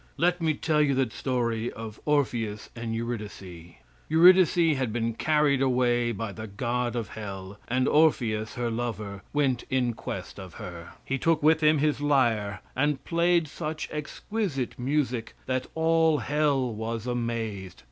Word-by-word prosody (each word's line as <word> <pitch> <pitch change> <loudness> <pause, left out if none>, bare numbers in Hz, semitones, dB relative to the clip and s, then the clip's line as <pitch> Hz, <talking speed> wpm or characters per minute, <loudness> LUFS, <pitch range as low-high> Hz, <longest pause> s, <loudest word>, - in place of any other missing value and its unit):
Let 175 +1 +2
me 160 -2 +1
tell 155 0 +1
you 140 -2 +2
the 130 -4 +1
story 120 -2 -1
of 110 -1 -8
Orpheus 120 -8 0
and 115 -1 -4
Eurydice. 100 -7 -6 0.3
Eurydice 170 -1 +6
had 130 -4 -1
been 115 0 -1
carried 150 +1 +2
away 120 -2 +2
by 110 -1 -4
the 110 +2 -7
god 120 +4 -2
of 115 -3 -3
hell, 100 -2 -7
and 130 +2 +1
Orpheus, 115 -9 +2
her 120 -2 -1
lover, 110 -4 -4
went 135 -4 +1
in 125 -2 +1
quest - - -6
of 95 -3 -10
her. 85 -2 -8
He 135 0 -2
took 165 0 +2
with 160 +1 +5
him 155 0 +5
his 150 0 +1
lyre, 115 -9 +1
and 145 +1 0
played 170 -1 +2
such 155 +1 -4
exquisite 150 - -3
music 130 -3 -1
that 130 0 -1
all 160 -1 +3
hell 140 -5 +1
was 110 +1 -4
amazed. 115 -6 -3
125 Hz, 150 wpm, -27 LUFS, 115-150 Hz, 0.3 s, Eurydice